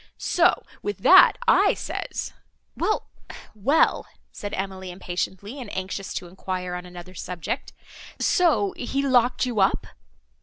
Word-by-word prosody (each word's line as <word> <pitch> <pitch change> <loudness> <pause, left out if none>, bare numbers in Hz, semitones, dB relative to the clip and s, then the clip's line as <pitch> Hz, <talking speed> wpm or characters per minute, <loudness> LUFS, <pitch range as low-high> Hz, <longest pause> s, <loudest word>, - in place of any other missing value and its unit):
So, 355 +1 +2 0.2
with 410 - -5
that - - +8
I - - +5
says—" - - -5 0.4
"Well, 430 - -1 0.4
well," 240 +10 +2 0.2
said 205 - -6
Emily, 190 -1 -5
impatiently, 190 +6 -5
and 230 - -8
anxious 190 +1 -4
to 180 - -4
enquire 180 0 -5
on 180 0 -6
another 180 +1 -11
subject,—"so 200 - -1
he 275 +3 -2
locked 250 -1 +3
you 240 -4 -2
up?" 190 - +2
195 Hz, 120 wpm, -24 LUFS, 185-250 Hz, 0.4 s, that